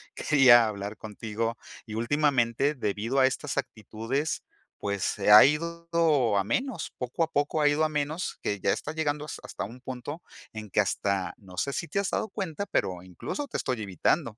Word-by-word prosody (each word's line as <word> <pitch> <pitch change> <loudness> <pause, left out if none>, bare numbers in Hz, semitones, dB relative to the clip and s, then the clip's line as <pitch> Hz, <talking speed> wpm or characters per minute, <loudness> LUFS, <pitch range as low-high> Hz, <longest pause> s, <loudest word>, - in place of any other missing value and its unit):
quería 125 -5 +6
hablar 100 0 -5
contigo 110 +2 -4 0.3
y, 110 - -8
últimamente, 135 +1 +2
debido 115 +2 -1
a 130 - +6
estas 140 +2 -3
actitudes, 125 +4 -3 0.4
pues, 100 -1 -2
se 105 0 0
ha 105 - +11
ido 165 -5 +1
a 100 - +2
menos, 220 - -2
poco 125 +6 -1
a - - 0
poco 145 +2 0
ha 150 - +5
ido 145 +2 +3
a 155 - +2
menos, 150 +3 -2
que 100 -1 -2
ya 95 - +2
está 150 - -4
llegando 150 -2 -1
has 150 - -6
hasta - - -6
un 120 +5 -10
punto 130 +6 -6 0.3
en 110 -1 -7
que - - +1
hasta, 100 -1 0
no 90 -3 -14
sé 140 - 0
si 170 - -3
te 200 - -1
has 200 - 0
dado 220 - -1
cuenta, 195 -1 -4
pero 90 - -1
incluso, 95 - -5
te - - -4
estoy 125 -5 -2
evitando". 100 +4 0
130 Hz, 190 wpm, -28 LUFS, 105-150 Hz, 0.4 s, ha